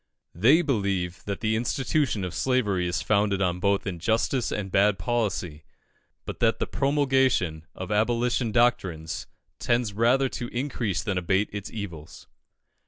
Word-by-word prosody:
They 130 Hz, -, +4 dB
believe 100 Hz, -, -1 dB
that 100 Hz, -1 st, -4 dB
the 110 Hz, 0 st, +1 dB
institution 125 Hz, -1 st, 0 dB
of 90 Hz, -2 st, -4 dB
slavery 105 Hz, -9 st, +1 dB
is 95 Hz, +4 st, -2 dB
founded 100 Hz, -1 st, +2 dB
on 90 Hz, -2 st, 0 dB
both 100 Hz, +1 st, +1 dB
injustice 110 Hz, +7 st, 0 dB
and 100 Hz, -2 st, -3 dB
bad 100 Hz, +1 st, +3 dB
policy; 95 Hz, -7 st, -2 dB, 0.6 s
but -, -, -6 dB
that -, -, +2 dB
the -, -, -1 dB
promulgation 130 Hz, -, +1 dB
of 95 Hz, +1 st, -6 dB
Abolition 115 Hz, +2 st, +1 dB
doctrines 95 Hz, -9 st, 0 dB, 0.3 s
tends 120 Hz, -3 st, 0 dB
rather 120 Hz, +5 st, +3 dB
to 125 Hz, -2 st, -5 dB
increase 120 Hz, -6 st, -2 dB
than 95 Hz, -3 st, -1 dB
abate 95 Hz, +3 st, 0 dB
its 100 Hz, -1 st, -5 dB
evils. 85 Hz, -8 st, -8 dB
105 Hz, 140 wpm, -26 LUFS, 95-120 Hz, 0.6 s, They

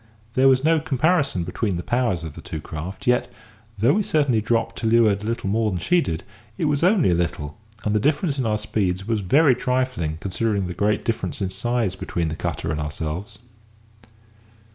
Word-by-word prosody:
There 130 Hz, +2 st, +4 dB
was 130 Hz, 0 st, +4 dB
no 160 Hz, +1 st, +4 dB
comparison 150 Hz, -, +1 dB
between 90 Hz, +2 st, -2 dB
the 85 Hz, -, -4 dB
powers 120 Hz, -9 st, 0 dB
of 80 Hz, -3 st, -6 dB
the -, -, -10 dB
two 80 Hz, -, -6 dB
craft, 80 Hz, +5 st, -7 dB
yet, 125 Hz, 0 st, +2 dB, 0.5 s
though 115 Hz, +7 st, +4 dB
we 215 Hz, -, +2 dB
certainly 140 Hz, -, +2 dB
dropped 115 Hz, +1 st, 0 dB
to 115 Hz, -, -1 dB
leeward 110 Hz, -3 st, +4 dB
a 105 Hz, -, -5 dB
little 115 Hz, -3 st, -2 dB
more 110 Hz, +2 st, +1 dB
than 90 Hz, -3 st, -2 dB
she 175 Hz, -, +3 dB
did, 80 Hz, -, -3 dB, 0.3 s
it -, -, 0 dB
was 145 Hz, -2 st, +1 dB
only 180 Hz, -, +4 dB
a -, -, +3 dB
little; 85 Hz, -3 st, -2 dB, 0.2 s
and 105 Hz, -, 0 dB
the 105 Hz, -, +3 dB
difference 145 Hz, -, +1 dB
in 130 Hz, -, 0 dB
our 105 Hz, -1 st, +1 dB
speeds 100 Hz, -2 st, -2 dB
was 110 Hz, -2 st, 0 dB
very 135 Hz, -, +5 dB
trifling, 125 Hz, -11 st, -1 dB
considering 100 Hz, +3 st, -1 dB
the 90 Hz, -, -4 dB
great 105 Hz, +3 st, 0 dB
difference 115 Hz, -, -2 dB
in 95 Hz, -2 st, -2 dB
size 120 Hz, -1 st, -1 dB
between 85 Hz, -3 st, -2 dB
the 80 Hz, -, -4 dB
cutter 80 Hz, -, -3 dB
and 75 Hz, -1 st, -2 dB
ourselves. 75 Hz, +5 st, -5 dB
110 Hz, 200 wpm, -23 LUFS, 90-130 Hz, 0.5 s, very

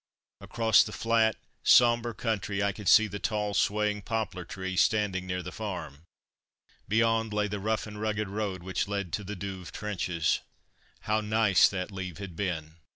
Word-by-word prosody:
Across 115 Hz, -2 st, +3 dB
the -, -, -6 dB
flat, 115 Hz, -1 st, +2 dB, 0.3 s
sombre 120 Hz, -1 st, +5 dB
country 105 Hz, -3 st, -1 dB
I 100 Hz, -, +2 dB
could 100 Hz, 0 st, -2 dB
see 110 Hz, -, +7 dB
the 100 Hz, -1 st, -6 dB
tall, 105 Hz, -1 st, -1 dB
swaying 105 Hz, +1 st, +1 dB
poplar 110 Hz, -4 st, -3 dB
trees 95 Hz, +1 st, -1 dB
standing 100 Hz, -4 st, +1 dB
near 90 Hz, 0 st, -2 dB
the 90 Hz, -, -6 dB
farm. 90 Hz, -8 st, -6 dB, 0.8 s
Beyond 115 Hz, 0 st, +2 dB
lay 105 Hz, 0 st, +1 dB
the 105 Hz, 0 st, -4 dB
rough 110 Hz, +2 st, -1 dB
and 105 Hz, -1 st, -8 dB
rugged 110 Hz, -1 st, -1 dB
road 100 Hz, -3 st, -3 dB
which 95 Hz, +1 st, -2 dB
led 100 Hz, -4 st, -3 dB
to 105 Hz, -, -2 dB
the 105 Hz, +2 st, -6 dB
Douve 95 Hz, -1 st, -6 dB
trenches. 90 Hz, -6 st, -1 dB, 0.6 s
How 110 Hz, +1 st, 0 dB
nice 105 Hz, -3 st, +4 dB
that 95 Hz, 0 st, -4 dB
leave 95 Hz, -3 st, -6 dB
had 100 Hz, -4 st, -8 dB
been! 80 Hz, -4 st, -3 dB
105 Hz, 165 wpm, -29 LUFS, 95-110 Hz, 0.8 s, see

